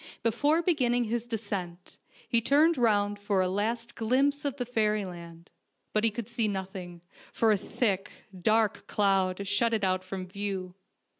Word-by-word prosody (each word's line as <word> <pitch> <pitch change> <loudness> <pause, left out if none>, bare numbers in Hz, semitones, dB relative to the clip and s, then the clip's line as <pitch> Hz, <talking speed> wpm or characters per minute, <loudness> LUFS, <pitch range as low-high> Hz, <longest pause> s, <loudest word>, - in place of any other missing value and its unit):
Before 290 +9 +2
beginning 250 -8 +2
his 235 +1 -2
descent 195 -6 -5 0.3
he 235 - +3
turned 300 +7 +4
round 205 -4 +2
for 205 -1 0
a 185 - +2
last 220 +5 -2
glimpse 270 +5 +1
of 280 -1 -2
fairyland; 200 -9 -2 0.4
but 215 - +2
he 225 - +5
could 220 0 -6
see 235 -2 0
nothing, 190 -3 -5 0.3
for 225 -1 +2
a - - +5
thick, 195 -1 -1 0.2
dark 215 +3 +1
cloud 195 -1 +1
shut 225 +3 +2
it 215 - -2
out 185 -1 +1
from 185 0 -5
view. 190 -1 -4
210 Hz, 150 wpm, -29 LUFS, 190-235 Hz, 0.4 s, he